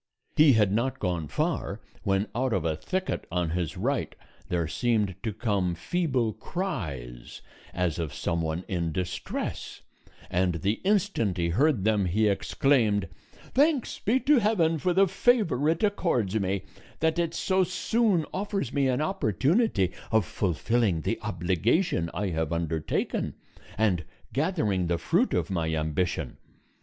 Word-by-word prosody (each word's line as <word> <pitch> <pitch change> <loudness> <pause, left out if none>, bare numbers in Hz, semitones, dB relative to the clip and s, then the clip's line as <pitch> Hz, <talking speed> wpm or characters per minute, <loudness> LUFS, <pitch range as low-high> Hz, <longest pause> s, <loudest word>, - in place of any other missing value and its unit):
He 150 -3 +7
had 105 -4 +3
not 120 +6 0
gone 85 -4 -2
far, - - -2 0.2
when 95 +1 +1
out 125 +1 0
of 95 -5 0
a 80 -1 +1
thicket 185 - -3
on 85 -2 0
his 90 +1 -2
right 125 +6 -1 0.3
there 85 -2 0
seemed 105 +1 +1
to 110 - -2
come 100 -5 0
feeble 130 - 0
cries 80 - -5 0.3
as 90 -3 -1
of 80 -4 -2
some 85 0 -2
one 80 +2 -2
in 85 -3 -1
distress; 90 +3 -4 0.5
and 90 -1 +1
the 100 +3 0
instant 190 - +1
he 85 -1 0
heard 125 - +2
them 105 -2 +2
he 105 +5 +2
exclaimed: 105 -1 +2 0.4
"Thanks 285 -1 +2
be 240 +6 +2
to 285 +1 +5
heaven 175 -7 +2
for 180 +4 +1
the 195 +2 +4
favor 185 - +2
it 165 +7 0
accords 165 - +1
me, 95 0 -1 0.4
that 160 +1 +1
it 170 -1 -1
so 190 0 +2
soon 185 -1 +1
offers 200 0 -2
me 140 -2 +2
an 130 +2 +1
opportunity 150 - +1 0.2
of 110 -4 +3
fulfilling 95 - 0
the 115 +7 -2
obligation 95 - 0
I 105 -2 -2
have 80 -2 -2
undertaken, 80 -2 -1 0.4
and 100 -5 +2 0.3
gathering 130 - 0
the 85 0 +1
fruit 180 - +1
of - - -1
my 80 -3 0
ambition. 80 -2 -1
105 Hz, 145 wpm, -27 LUFS, -, 0.5 s, He